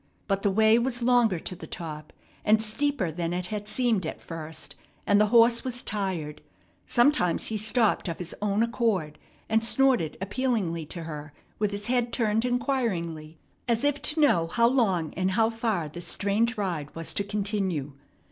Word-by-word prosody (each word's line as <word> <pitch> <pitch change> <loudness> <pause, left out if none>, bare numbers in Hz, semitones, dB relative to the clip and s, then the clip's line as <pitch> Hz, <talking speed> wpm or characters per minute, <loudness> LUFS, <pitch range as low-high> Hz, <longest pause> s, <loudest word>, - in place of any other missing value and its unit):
But 195 -1 0
the 200 - +2
way 220 +3 +4
was 240 0 -1
longer 240 -6 +4
to 180 - -6
the - - -10
top, 155 -3 -7 0.3
and 215 +1 +4
steeper 220 - 0
than 170 +1 -3
it 180 0 -2
had 210 -1 -4
seemed 230 -3 +1
at - - -6
first, 160 -1 -7 0.3
and 205 +1 +4
the 210 - +4
horse 235 +1 +5
was 250 -2 -3
tired. 185 -8 -3 0.5
Sometimes 240 - +2
he 220 - -3
stopped 220 0 +1
of 170 - -3
his 175 -2 -6
own 210 +1 +1
accord, 220 -10 -1 0.3
and 220 0 +2
snorted 240 - +2
appealingly 195 - -1
to 170 +1 -6
her 150 -2 -7 0.3
with 210 -1 +1
his 205 0 -5
head 245 -1 0
turned 225 -1 +1
inquiringly 200 - -2 0.3
as 235 0 +1
if 290 0 +1
to 310 +1 +2
know 170 - +4
how 235 +7 +2
long 195 - +1
and 185 +1 0
how 225 +2 +3
far 225 -8 -1
this 170 +3 -7
strange 215 +4 0
ride 170 -8 -2
was 165 0 -4
to 200 - 0
continue. 200 -8 -2
210 Hz, 175 wpm, -27 LUFS, 170-235 Hz, 0.5 s, horse